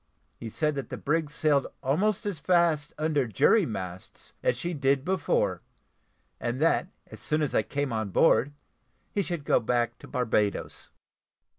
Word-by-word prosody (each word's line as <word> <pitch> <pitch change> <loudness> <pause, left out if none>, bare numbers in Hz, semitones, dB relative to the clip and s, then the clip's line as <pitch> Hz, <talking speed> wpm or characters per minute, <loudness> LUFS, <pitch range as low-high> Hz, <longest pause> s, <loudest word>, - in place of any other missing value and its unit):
He 115 - -6
said, 150 +7 0
that 140 -1 -5
the - - -5
brig 155 +1 0
sailed 145 -2 +2 0.2
almost 195 - +1
as 200 -7 -3
fast 165 -3 +2
under 150 -4 +1
jury 165 - +3
masts 95 -5 -7
as - - +1
she 175 +1 -3
did 140 -2 +1
before, 185 -4 0 0.8
and 120 +2 -2
that, 165 +3 +2 0.2
as - - -10
soon 150 0 0
as 145 - -1
I - - +4
came 140 -3 -3
on 110 -2 -2
board, 145 - +3 0.6
he 205 - 0
should 170 -6 -4
go - - +4
back 120 0 -1
to - - -12
Barbadoes. 110 -5 -1
145 Hz, 160 wpm, -27 LUFS, 120-165 Hz, 0.8 s, I